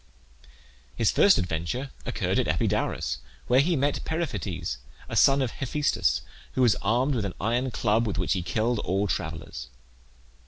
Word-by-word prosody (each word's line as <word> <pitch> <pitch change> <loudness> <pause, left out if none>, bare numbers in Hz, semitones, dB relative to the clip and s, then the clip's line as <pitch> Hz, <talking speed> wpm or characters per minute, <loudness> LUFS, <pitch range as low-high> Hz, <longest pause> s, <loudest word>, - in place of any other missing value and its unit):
His 115 -3 +2
first 200 - +6
adventure 90 - -2 0.2
occurred - - 0
at - - +1
Epidaurus, - - 0 0.3
where 125 +1 +4
he 165 +5 +3
met 140 0 0
Periphetes, 130 - -3 0.3
a - - -5
son 135 0 +5
of 125 - -2
Hephaestus, 145 +2 0 0.3
who 130 - +2
was 120 -4 +5
armed 125 +7 +2
with 115 -5 -1
an 95 -3 -4
iron 120 +5 0
club, 115 -1 +1
with 100 - -2
which 90 0 +1
he 95 - -1
killed 110 +6 0
all 100 +2 0
travellers. 80 -8 -4
115 Hz, 155 wpm, -27 LUFS, 95-135 Hz, 0.3 s, first